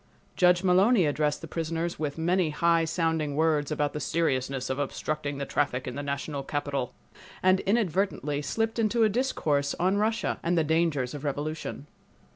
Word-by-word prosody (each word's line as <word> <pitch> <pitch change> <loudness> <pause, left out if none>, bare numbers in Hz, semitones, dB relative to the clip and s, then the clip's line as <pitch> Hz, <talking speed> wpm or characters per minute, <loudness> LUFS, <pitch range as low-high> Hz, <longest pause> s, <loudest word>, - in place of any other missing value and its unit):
Judge 180 0 +4
Mullowny 190 +2 +4
addressed 150 0 0
the 165 - -7
prisoners 165 +1 -3
with 150 -1 -3
many 175 +1 +1
high 165 +2 +2
sounding 160 -3 -1
words 155 -2 +2
about 145 -1 0
the 150 - -3
seriousness 135 -4 -1
of 130 +1 -2
obstructing 145 0 -3
the 140 - -3
traffic 130 -2 -1
in 125 - -4
the 140 - -4
national 140 0 -3
capital, 140 -2 -3 0.5
and 185 0 +5
inadvertently 190 -8 0
slipped 225 - -1
into 225 +1 +2
a 215 - +4
discourse 155 - 0
on 185 +3 +2
Russia, 220 +2 0
and 170 +1 0
the 165 - +4
dangers 155 -5 +1
of 145 -1 -7
revolution. 145 0 -4
155 Hz, 165 wpm, -27 LUFS, 145-180 Hz, 0.5 s, and